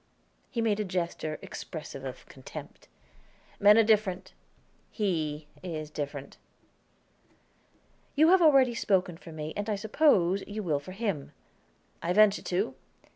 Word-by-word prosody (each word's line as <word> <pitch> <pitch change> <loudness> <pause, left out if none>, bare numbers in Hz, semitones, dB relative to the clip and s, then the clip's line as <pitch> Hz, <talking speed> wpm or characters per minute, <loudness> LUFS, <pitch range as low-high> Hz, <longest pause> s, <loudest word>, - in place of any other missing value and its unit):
He 235 - -2
made 215 -2 +1
a - - +1
gesture, 170 -4 -3
expressive 150 -4 -7
of 130 -2 -7
contempt. 130 - -11 0.7
"Men 205 +1 +7
are 225 - +7
different; 195 -4 +1 0.6
he 160 -8 -2 0.2
is 155 -4 -5
different." 145 -2 -6 1.8
"You 310 +3 +5
have 375 0 +6
already 270 -6 +6
spoken 185 -6 +1
for 165 0 -12
me, 155 0 -6
and, 205 +1 -3
I 210 - +1
suppose, 200 - +3
you 210 +1 -5
will 155 -6 0
for 165 +6 -10
him." 195 -9 -3 0.7
"I 175 - 0
venture 210 0 +5
to. 190 +5 -1
185 Hz, 130 wpm, -29 LUFS, 155-215 Hz, 1.8 s, Men